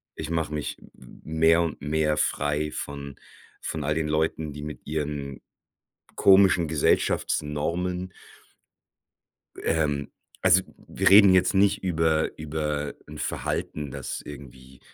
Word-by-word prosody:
ich 80 Hz, 0 st, -6 dB
mache 80 Hz, -2 st, -2 dB
mich 75 Hz, -, -4 dB
m -, -, -17 dB
m -, -, -16 dB
m 80 Hz, 0 st, -5 dB
mehr 80 Hz, +1 st, +5 dB
und 80 Hz, -4 st, -3 dB
mehr 75 Hz, +1 st, 0 dB
frei 75 Hz, +1 st, 0 dB
von 70 Hz, -1 st, -6 dB, 0.5 s
von 80 Hz, -, -4 dB
all 75 Hz, +1 st, 0 dB
den 80 Hz, -1 st, -1 dB
Leuten, 75 Hz, -1 st, -1 dB
die 75 Hz, -, -8 dB
mit 75 Hz, -1 st, -8 dB
ihren 75 Hz, -3 st, -4 dB, 0.7 s
komischen 95 Hz, -3 st, +5 dB
Gesellschaftsnormen 85 Hz, +4 st, 0 dB, 1.5 s
ähm, 75 Hz, -3 st, 0 dB, 0.3 s
also 95 Hz, 0 st, +5 dB, 0.2 s
wir -, -, +1 dB
reden 100 Hz, -1 st, +8 dB
jetzt 90 Hz, -, +3 dB
nicht 100 Hz, 0 st, +3 dB
über 80 Hz, -3 st, +1 dB
über 75 Hz, -1 st, -3 dB
'n -, -, -9 dB
Verhalten, 75 Hz, -2 st, -3 dB
das -, -, -5 dB
irgendwie 65 Hz, -2 st, -12 dB
75 Hz, 130 wpm, -26 LUFS, 75-80 Hz, 1.5 s, reden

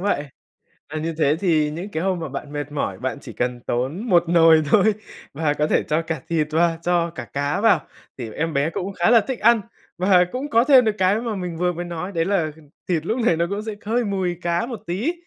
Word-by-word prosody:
vậy, 190 Hz, -7 st, 0 dB, 0.7 s
và 155 Hz, -, -2 dB
như 165 Hz, +1 st, -3 dB
thế 150 Hz, -2 st, +3 dB
thì 155 Hz, -6 st, +2 dB
những 175 Hz, +7 st, -6 dB
cái 160 Hz, -2 st, -3 dB
hôm 190 Hz, -2 st, 0 dB
mà 160 Hz, -3 st, -5 dB
bạn 140 Hz, +2 st, -7 dB
mệt 145 Hz, 0 st, -4 dB
mỏi, 100 Hz, -10 st, -3 dB
bạn 130 Hz, +2 st, -3 dB
chỉ 120 Hz, -, -10 dB
cần 125 Hz, +1 st, -2 dB
tốn 150 Hz, -, -2 dB
một 175 Hz, -2 st, +5 dB
nồi 165 Hz, -2 st, +6 dB
thôi 215 Hz, +1 st, +5 dB, 0.4 s
và 150 Hz, 0 st, 0 dB
có 150 Hz, +1 st, 0 dB
thể -, -, +2 dB
cho 155 Hz, +2 st, 0 dB
cả 165 Hz, -3 st, -4 dB
thịt 160 Hz, -3 st, +1 dB
và 165 Hz, +1 st, +2 dB
cho 170 Hz, -1 st, +1 dB
cả 145 Hz, -8 st, -8 dB
cá 145 Hz, +6 st, -1 dB
vào 225 Hz, -1 st, +5 dB, 0.4 s
thì 115 Hz, -4 st, -6 dB
em 160 Hz, +4 st, -2 dB
bé 140 Hz, +3 st, +1 dB
cũng 185 Hz, +4 st, -4 dB
khá 180 Hz, +3 st, +2 dB
là 235 Hz, -2 st, +6 dB
thích 260 Hz, +1 st, -5 dB
ăn. 230 Hz, +1 st, +4 dB, 0.4 s
Và 180 Hz, 0 st, +4 dB
cũng 265 Hz, +4 st, -4 dB
có 230 Hz, -2 st, +4 dB
thêm 260 Hz, -2 st, +6 dB
được 215 Hz, -1 st, +1 dB
cái 190 Hz, +3 st, +2 dB
mà 230 Hz, -3 st, -3 dB
mình 180 Hz, -3 st, -5 dB
vừa 180 Hz, +1 st, 0 dB
mới 175 Hz, +1 st, -5 dB
nói 175 Hz, +2 st, -5 dB
đấy 165 Hz, -3 st, 0 dB
là 185 Hz, -6 st, 0 dB, 0.4 s
thịt 165 Hz, -3 st, -1 dB
lúc 225 Hz, +7 st, -1 dB
này 170 Hz, -, +3 dB
nó 170 Hz, -, +1 dB
cũng 200 Hz, +1 st, -3 dB
sẽ 220 Hz, -1 st, -4 dB
hơi 235 Hz, +3 st, +1 dB
mùi 190 Hz, -4 st, -2 dB
cá 175 Hz, +3 st, 0 dB
một 235 Hz, -3 st, -6 dB
tí, 210 Hz, -, -1 dB
170 Hz, 245 wpm, -22 LUFS, 155-200 Hz, 0.7 s, nồi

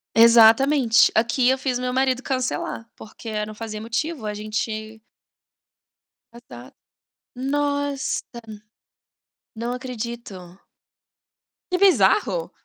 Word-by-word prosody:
Exatamente, 230 Hz, +2 st, +5 dB
aqui 235 Hz, +3 st, +2 dB
eu 265 Hz, -, +2 dB
fiz 260 Hz, -2 st, -2 dB
meu 250 Hz, 0 st, -2 dB
marido 260 Hz, 0 st, 0 dB
cancelar, 255 Hz, -3 st, -3 dB
porque 215 Hz, 0 st, -6 dB
não 215 Hz, -, -9 dB
fazia 215 Hz, -1 st, -7 dB
motivo, 230 Hz, +2 st, -3 dB
a 210 Hz, -, -3 dB
gente 215 Hz, +1 st, -5 dB, 1.3 s
Exato. 130 Hz, -, -14 dB, 0.6 s
Nossa! 285 Hz, +1 st, -2 dB, 1.3 s
Não 235 Hz, +2 st, -4 dB
acredito. 235 Hz, -3 st, -6 dB, 1.4 s
Que 365 Hz, -, +1 dB
bizarro! 400 Hz, +5 st, +2 dB
240 Hz, 90 wpm, -22 LUFS, 220-265 Hz, 1.4 s, Exatamente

